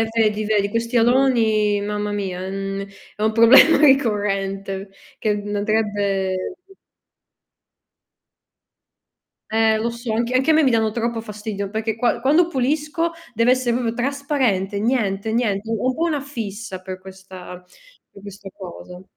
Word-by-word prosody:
eh, 225 - +2
vedi, 215 -1 +2
vedi. 205 -1 +1
Questi 230 +3 -2
aloni, 225 -4 +3
mamma 210 0 -3
mia, 190 -3 -3
en 195 +1 -4 0.3
è 210 - -5
un 215 0 +2
problema 230 +8 +7
ricorrente, 195 -7 +1 0.3
che 210 -1 0
andrebbe 205 - -1 3.0
Eh, 220 0 +3
lo 230 +2 -1
so, 235 -1 -5
anche 235 +2 -1
anche 265 +5 +3
a 315 - +5
me 315 - +5
mi 265 - +3
danno 220 -1 +2
troppo 235 0 -2
fastidio, 210 -2 -5
perché 220 +1 -2
qua 240 +1 0
quando 305 +7 +4
pulisco 305 +3 -1 0.2
deve 230 +3 +3
essere 255 -2 +1
proprio 235 -2 -1
trasparente, 255 -7 -1
niente, 220 -3 0
niente. 220 -3 -1
Ho 225 +2 -1
un 255 - 0
po' 325 - -3
una 305 -4 0
fissa 220 -7 -6
per 185 0 -7
questa 185 -1 -11 0.5
per 200 - -15
questa 200 -1 -10
cosa. 180 -1 -10
220 Hz, 140 wpm, -21 LUFS, 200-245 Hz, 3.0 s, problema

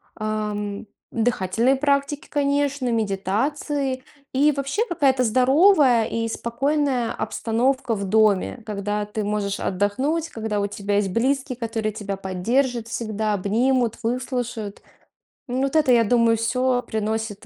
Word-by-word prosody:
ам, 210 -1 -3 0.2
дыхательные 230 +2 +1
практики, 280 +2 0
конечно, 285 -2 0
медитации. 240 +6 -1 0.3
И 290 +3 +4
вообще 275 +10 -1
какая-то 270 - +2
здоровая 260 - +5
и 230 +1 -2
спокойная 255 +1 0
обстановка 235 +3 -1
в 200 -1 -3
доме. 215 +2 +2
Когда 210 0 -2
ты 210 0 -4
можешь 205 -1 -2
отдохнуть, 260 - -1
когда 220 -4 -2
у 200 - 0
тебя 205 0 -3
есть 200 -1 +1
близкие, 255 +4 0
которые 225 -2 -2
тебя 205 -2 -4
поддержат 225 +6 -1
всегда, 220 -2 -2
обнимут, 230 +4 +1
выслушают. 240 -3 -3 0.7
М, 255 +1 -1
вот 275 +2 -1
это, 300 -5 +4
я 235 -2 +5
думаю, 230 0 +3
всё 250 +2 +1
приносит 220 -2 -3
230 Hz, 125 wpm, -23 LUFS, 210-265 Hz, 0.7 s, здоровая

